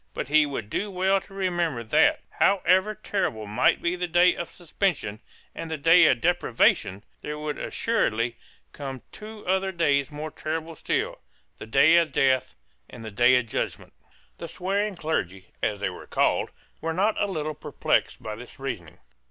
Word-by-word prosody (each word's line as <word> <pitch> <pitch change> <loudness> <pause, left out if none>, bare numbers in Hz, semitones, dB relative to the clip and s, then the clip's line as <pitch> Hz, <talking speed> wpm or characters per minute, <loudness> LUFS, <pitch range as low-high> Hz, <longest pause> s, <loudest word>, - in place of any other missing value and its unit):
But - - -4
he 155 0 +5
would 110 -7 -5
do 205 - -2
well 190 +1 +1
to 195 - -17
remember 175 -9 -1
that, 110 - +3 0.2
however 195 +1 +3
terrible 190 - -2
might 105 +4 +2
be 170 +1 +1
the 180 0 -3
day 175 +1 +5
of 170 - -5
suspension 165 - -2 0.3
and 165 - -6
the 160 - -3
day 165 +5 +6
of 125 - +2
deprivation, 120 - +2 0.2
there 150 0 -5
would 150 0 -4
assuredly 120 - 0 0.4
come 135 -3 -7
two 215 0 -10
other 190 +1 +1
days 145 -6 +1
more 150 +1 -6
terrible 160 +2 -4
still, - - -2 0.4
the - - -8
day 150 +8 +5
of 165 -3 +2
death 130 -2 +2 0.3
and 115 - -10
the 110 - -6
day 120 +5 +5
of 125 - 0
judgment, 115 - -4 0.5
The 170 - -5
swearing 195 +4 -2
clergy, 95 - -3
as 105 -2 -1
they 100 - -1
were - - -11
called, - - +1 0.3
were 165 0 -2
not 205 +5 +1
a 205 - +2
little 155 -5 -3
perplexed 150 -1 -1
by 110 - -4
this 120 +4 -11
reasoning. 115 - -6
155 Hz, 170 wpm, -26 LUFS, 125-180 Hz, 0.5 s, day